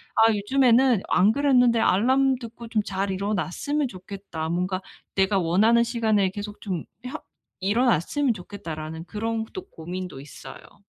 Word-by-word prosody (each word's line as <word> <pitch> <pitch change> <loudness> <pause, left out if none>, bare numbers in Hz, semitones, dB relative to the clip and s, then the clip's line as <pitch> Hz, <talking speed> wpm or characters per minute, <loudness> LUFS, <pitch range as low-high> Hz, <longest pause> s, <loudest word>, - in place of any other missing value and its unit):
아 225 0 +5
요즘에는 245 +1 +3
안 195 +4 +4
그랬는데 250 -4 +4
'알람 260 +7 +3
듣고 235 -1 -9
좀 220 -2 +1
잘 195 0 -2
일어났으면 205 +9 -1
좋겠다. 185 -4 -7
뭔가 185 +2 -1 0.3
내가 195 0 +2
원하는 205 +7 +4
시간에 220 -5 +1
계속 205 +2 -7
좀 185 -6 -4 0.2
혀 300 +5 -5 0.4
일어났으면 235 - +1
좋겠다.'라는 165 -5 -7
그런 225 +3 -2
또 375 0 -7
고민도 175 -3 -7
있어요. 145 +7 -13
210 Hz, 315 characters per minute, -25 LUFS, 185-235 Hz, 0.4 s, 아